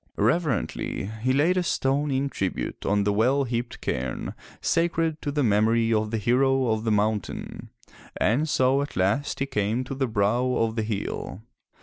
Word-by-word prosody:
Reverently 120 - 0
he 130 +3 +1
laid 155 +7 +3
a - - +3
stone 145 -3 0
in 135 +1 0
tribute 95 -8 -3
on 100 0 +2
the 105 0 +1
well 130 +7 +3
heaped 120 -1 -4
cairni 65 0 -3 0.3
sacred 165 -2 0
to 145 - -2
the 145 0 0
memory 115 +1 +3
of 110 0 +1
the 115 - -1
hero 130 +3 +2
of 110 +1 -1
the 110 - +1
mountain, 105 -1 -2 0.5
and 130 +11 +1
so 130 0 +3
at 145 - -5
last 100 +10 +1
he - - +2
came 115 -2 -1
to 130 - -6
the 135 -1 -1
brow 120 +4 +1
of 115 -2 0
the 110 - 0
hill. 105 -1 -4
120 Hz, 175 wpm, -25 LUFS, 105-140 Hz, 0.5 s, laid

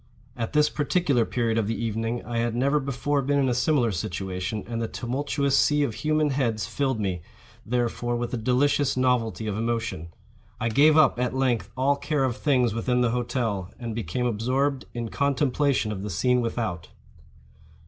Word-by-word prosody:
At 115 0 -4
this 150 0 +4
particular 145 -5 +1
period 115 -1 0
of 105 - -1
the 115 - -2
evening 115 +1 -2
I 120 -1 -2
had 115 0 -1
never 140 +4 +2
before 140 +1 -1
been 140 +2 +1
in 135 -1 +2
a 125 - +2
similar 125 -1 +2
situation, 95 +3 -3
and 115 -1 -4
the 115 - -1
tumultuous 140 +3 -1
sea 150 +1 +3
of 120 - -1
human 155 +3 +1
heads 115 -7 0
filled 135 -2 -1
me, 95 -4 -2 0.5
therefore, 120 0 -1
with 120 0 -3
a - - 0
delicious 135 +4 +1
novelty 125 -4 +1
of 105 -2 -2
emotion. 115 -7 -2 0.5
I 115 - 0
gave 150 +6 +5
up, 150 -5 +4
at 125 0 -1
length, 130 -4 0
all 140 +2 +2
care 150 -1 -1
of 130 -3 0
things 125 -7 +2
within 125 +2 0
the 120 -2 +2
hotel, 115 -6 -2
and 120 -2 -5
became 115 +2 -2
absorbed 130 +5 0
in 115 -1 -3
contemplation 140 -3 +1
of 100 -3 -4
the 105 - -4
scene 125 +8 +2
without. 110 -7 -3
120 Hz, 180 wpm, -25 LUFS, 115-140 Hz, 0.5 s, gave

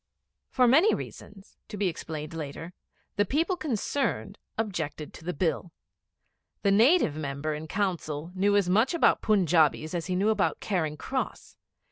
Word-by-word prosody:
For 250 -2 +3
many 315 - +5
reasons, 195 -1 -10
to 210 - -7
be 200 -1 +1
explained 160 -2 -5
later, 165 +2 -6 0.4
the 205 - +4
people 320 - 0
concerned 285 - -2 0.2
objected 165 -8 -3
to - - -12
the 180 - -2
Bill. 170 +1 -1 0.9
The 200 - +3
Native 225 - +4
Member 150 0 -3
in 155 +1 -6
Council 170 -5 -2
knew 200 +2 +2
as 200 -3 +3
much 220 - +3
about 335 - +3
Punjabis 165 -6 +2
as 170 -1 -3
he 185 - -1
knew 200 +4 +2
about 215 -2 +1
Charing 160 -7 -1
Cross. - - -4
185 Hz, 150 wpm, -28 LUFS, 155-215 Hz, 0.9 s, many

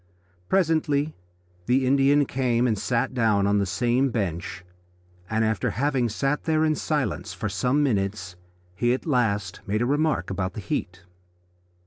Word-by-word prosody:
Presently 155 -5 +1 0.5
the 130 +2 +3
Indian 140 +2 +4
came 125 -2 0
and 115 -3 +2
sat 115 +5 -1
down 110 -5 +2
on 100 0 +2
the 100 - 0
same 120 +8 +1
bench, 90 -5 -3 0.6
and 110 0 +1
after 110 -4 0
having 135 -3 0
sat 135 +7 -1
there 160 -1 +2
in 155 - +2
silence - - -2
for - - -3
some 140 +4 +1
minutes 95 -7 -1 0.4
he 120 +7 +1
at - - -8
last 105 - 0
made 105 +3 0
a - - +1
remark 145 -3 0
about 95 0 -2
the - - -6
heat. 95 0 -4
120 Hz, 150 wpm, -25 LUFS, 100-140 Hz, 0.6 s, Indian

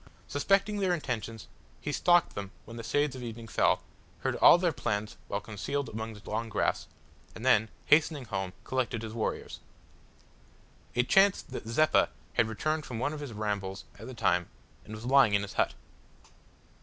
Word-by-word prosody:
Suspecting 195 +8 +2
their 185 -3 +2
intentions, 115 - -4 0.3
he - - -3
stalked 175 -1 +3
them 100 -1 -5 0.2
when 115 - -10
the 115 - -5
shades 145 +4 0
of 130 - -7
evening 115 -1 -7
fell, - - +2 0.4
heard - - 0
all - - +8
their 175 -1 +1
plans 105 -6 -2
while 100 - -2
concealed 125 +7 -3
among 110 0 -5
the 105 - -14
long 115 +2 -2
grass, 105 - 0 0.5
and - - -7
then, 110 +2 +4 0.2
hastening 150 -3 +3
home, 95 -4 -3
collected 120 -3 -1
his 110 -1 -6
warriors. 115 -1 -3 1.4
It 125 0 +2
chanced 195 0 +4
that - - -6
Zeppa 155 +7 +3 0.2
had 115 -2 +3
returned 155 +8 -1
from 125 -4 -6
one 140 +6 -1
of 155 - -6
his 145 -4 -6
rambles 100 -2 -3
at - - -9
the 130 - -8
time 90 -5 +1 0.4
and 110 - -8
was 110 +2 -9
lying 130 -5 +5
in 100 - +2
his 100 - -6
hut. - - +1
115 Hz, 175 wpm, -30 LUFS, 110-145 Hz, 1.4 s, all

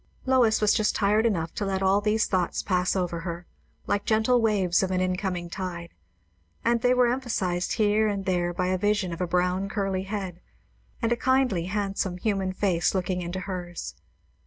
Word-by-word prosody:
Lois 250 -5 +3
was 210 -1 +4
just 215 -2 +1
tired 210 +3 +3
enough 165 -7 -1
to - - -3
let 195 -1 -1
all 195 +2 +3
these 215 +1 +2
thoughts 180 -3 -1
pass 180 -1 +1
over 175 -3 -1
her, 170 +1 -6 0.4
like 205 - 0
gentle 225 +3 +2
waves 195 -5 +2
of 190 - 0
an 185 -1 0
incoming 185 -1 -1
tide, 170 -1 -6 0.7
and 235 0 +2
they 245 - +3
were 250 0 +4
emphazised 190 -9 -1
here 215 -1 +2
and 200 -2 -2
there 175 -2 0
by 180 +1 -2
a 185 0 0
vision 205 -3 0
of 170 - -6
a 180 - 0
brown 180 +2 0
curly 195 -2 -1
head, 190 -3 -5 0.6
and 230 - +1
a - - +4
kindly, 255 -8 +1
handsome, 195 -1 -2
human 195 -1 -1
face 185 -2 0
looking 180 -1 -1
into 175 +2 -4
hers. 180 -2 -5
190 Hz, 185 wpm, -26 LUFS, 180-210 Hz, 0.7 s, was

